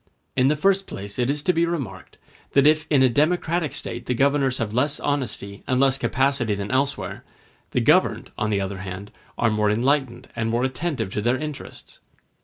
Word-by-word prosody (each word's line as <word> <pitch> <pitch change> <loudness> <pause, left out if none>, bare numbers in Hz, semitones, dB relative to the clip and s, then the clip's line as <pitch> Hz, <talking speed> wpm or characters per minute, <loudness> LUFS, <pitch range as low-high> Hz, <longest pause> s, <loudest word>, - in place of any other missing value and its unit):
In 130 - +3
the 150 - +3
first 195 +5 +2
place 100 +4 -7
it 120 +1 +1
is 145 +1 0
to 180 - +2
be 165 0 +2
remarked, 135 - -5 0.4
that 140 0 +5
if 155 +1 +4
in 140 -3 +4
a - - +7
democratic 155 +3 +1
State 120 -3 -6
the 125 - 0
governors 135 0 +2
have 110 -3 -3
less 140 +5 +1
honesty 125 -8 -2
and 130 0 +1
less 135 0 +3
capacity 130 -5 +1
than 100 +2 -4
elsewhere, 135 +2 -1 0.5
the - - 0
governed, - - +2
on 110 0 -1
the 100 -2 +1
other 95 0 -4
hand, 95 +2 -7 0.3
are 120 - +2
more 105 -1 +2
enlightened 130 +3 0
and 115 -1 -1
more 120 +2 0
attentive 130 - -2
to 105 - -1
their 120 +4 +1
interests. 150 0 -8
130 Hz, 195 wpm, -23 LUFS, 110-145 Hz, 0.5 s, a